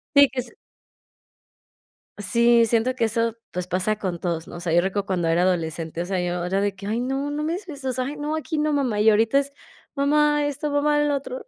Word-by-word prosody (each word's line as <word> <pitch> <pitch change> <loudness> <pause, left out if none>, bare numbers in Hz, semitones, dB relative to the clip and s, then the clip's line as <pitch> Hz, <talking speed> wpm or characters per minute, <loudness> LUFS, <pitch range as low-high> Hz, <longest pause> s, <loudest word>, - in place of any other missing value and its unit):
Sí, 280 0 +8
que 260 - -3
s 250 - -5 1.7
Sí, 235 +3 +4
siento 235 +3 +1
que 235 -3 +1
eso, 230 0 -1
pues, 180 0 -4
pasa 185 +4 0
con 180 -5 -3
todos, 170 -2 -3
¿no? - - -9
O - - -7
sea, 170 -2 -2
yo 175 - +5
recuerdo 195 +1 -2
cuando 180 -4 -1
era 170 +2 +3
adolescente, 165 -2 -1
o - - -3
sea, 190 -1 -1
yo 175 0 -2
era 190 +2 0
de 200 -1 -1
que: 195 +1 -10
"Ay, 225 +3 -1
no, 270 +3 -2
no 300 +1 -3
me 320 +2 -1
digas 365 -1 -6
eso. 275 -3 -5
O - - +1
sea, 255 0 -2
ay, 290 +2 -5
no, 300 +2 -2
aquí 315 0 -3
no, 300 0 +1
mamá", 250 -7 0
y 220 +1 +5
ahorita 225 +5 +3
es: 280 0 -4 0.4
"Mamá, 295 +1 +2
esto, 290 +1 -2
mamá, 295 +1 +2
lo 295 -1 +2
otro". 260 -2 -6
235 Hz, 240 wpm, -23 LUFS, 185-285 Hz, 1.7 s, Sí